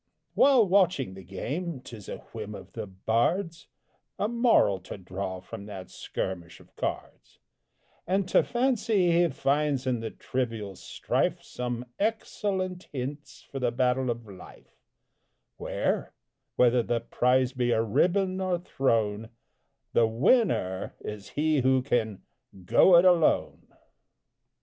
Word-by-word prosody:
'" - - -51
While 260 -6 +5
watching 180 - +2
the 95 - -10
game, 135 - -4
'tis 115 -5 -11
a - - -5 0.2
whim 105 -2 -6
of 95 - -11
the 110 -2 -5
bard's 120 - -1 0.5
A 205 - 0
moral 235 - +3
to - - -9
draw 95 0 -5
from 100 +2 -9
that 95 -3 -8
skirmish 90 -2 -5
of - - -21
cards, - - -5 0.7
And 190 +1 +1
to - - +5
fancy 230 -7 +1
he 170 +1 +4
finds 140 -1 0
in 125 -2 0
the 110 0 -4
trivial 115 -7 -4
strife - - -2
Some 125 0 -4
excellent 195 -4 -2
hints 140 +2 -6
for 135 - -7
the 125 -2 +1
battle 125 +1 +1
of 120 -1 -3
Life; 95 -3 -14 0.8
Where - - -2 0.4
whether 125 0 +4
the 115 0 -1
prize 125 +2 +1
be 125 -2 0
a 115 -1 +2
ribbon 185 - +1
or 185 -1 0
throne 115 - 0 0.6
The 115 - +4
winner 115 - +1
is 105 -2 -7
he 155 -1 +2
who 130 0 +3
can 110 -7 -1 0.4
"go 175 - +6
it 175 - +5
alone!" 175 -3 +3
125 Hz, 135 wpm, -28 LUFS, 110-175 Hz, 0.8 s, go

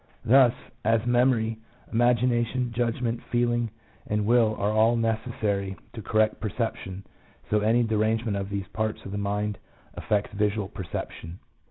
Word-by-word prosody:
Thus, 125 0 +6 0.3
as 115 0 +2
memory, 120 -2 +2 0.3
imagina 120 0 +3
tion, 125 0 -2
judgment, 115 0 -1
feeling, 120 -1 +1 0.4
and 105 0 0
will 115 -1 +4
are 100 +1 +1
all 110 +2 +4
necessary 110 -4 -1 0.2
to 115 - -6
correct 110 0 +1
perception, 100 -3 -3 0.5
so 105 - +4
any 115 +3 +3
derangement 110 0 +1
of 100 0 -3
these 100 -1 -3
parts 110 0 -3
of 95 - -6
the 100 - -3
mind 105 0 -2 0.4
affects 105 -1 -1
visual 105 -1 0
perception. 85 -2 -6
110 Hz, 140 wpm, -26 LUFS, 105-120 Hz, 0.5 s, Thus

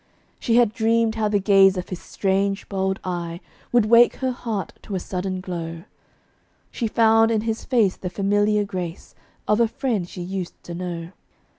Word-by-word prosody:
She 230 - +1
had 235 -3 +4
dreamed 230 -1 +2
how 220 -1 0
the 210 0 +2
gaze 195 -1 +5
of 180 - -5
his 185 - -6
strange, 195 0 -1
bold 190 -1 -1
eye 175 -2 -4 0.3
Would 240 -3 +4
wake 235 +2 +6
her 260 -1 -1
heart 230 -5 -4
to 200 - -6
a - - 0
sudden 185 +1 -4
glow: 165 -2 -6 0.9
She 235 - -2
found 225 0 +4
in 220 -2 +1
his 225 0 -3
face 225 -7 +2
the 180 - -5
familiar 205 +3 +1
grace 180 -4 -6 0.3
Of 210 +1 +3
a 235 - +4
friend 220 -7 -2
she 180 - -7
used 185 0 -5
to 175 - -8
know. 170 -1 -5
200 Hz, 175 wpm, -23 LUFS, 185-225 Hz, 0.9 s, wake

